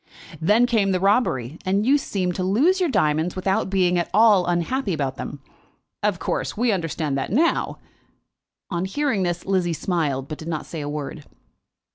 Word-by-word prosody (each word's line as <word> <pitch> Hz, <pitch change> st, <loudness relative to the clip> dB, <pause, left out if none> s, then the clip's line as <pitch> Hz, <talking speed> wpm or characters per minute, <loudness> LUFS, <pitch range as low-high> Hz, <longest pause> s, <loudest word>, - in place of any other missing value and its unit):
"Then 210 Hz, +9 st, +4 dB
came 220 Hz, -5 st, +2 dB
the 185 Hz, -, +1 dB
robbery, 180 Hz, -, +1 dB
and 195 Hz, +3 st, +1 dB
you 280 Hz, +3 st, +4 dB
seemed 185 Hz, -9 st, -2 dB
to 185 Hz, -, -3 dB
lose 275 Hz, -, +3 dB
your 360 Hz, -3 st, +1 dB
diamonds 155 Hz, -, +1 dB
without 190 Hz, +1 st, 0 dB
being 180 Hz, -2 st, +2 dB
at 170 Hz, -, -2 dB
all 210 Hz, -5 st, +5 dB
unhappy 185 Hz, +6 st, 0 dB
about 140 Hz, -3 st, -2 dB
them. 140 Hz, -2 st, -7 dB, 0.6 s
Of -, -, +1 dB
course, -, -, -3 dB
we 240 Hz, +1 st, +2 dB
understand 165 Hz, -6 st, -2 dB
that 135 Hz, -, -4 dB
now." 315 Hz, -, +1 dB, 0.9 s
On 175 Hz, 0 st, -1 dB
hearing 240 Hz, +1 st, 0 dB
this, 175 Hz, -1 st, -2 dB
Lizzie 185 Hz, -3 st, +1 dB
smiled, 150 Hz, -6 st, -1 dB
but 155 Hz, -, -7 dB
did 160 Hz, -, -8 dB
not 160 Hz, -3 st, -3 dB
say 160 Hz, -, -6 dB
a 145 Hz, -, -4 dB
word. 145 Hz, 0 st, -5 dB
185 Hz, 175 wpm, -23 LUFS, 160-210 Hz, 0.9 s, all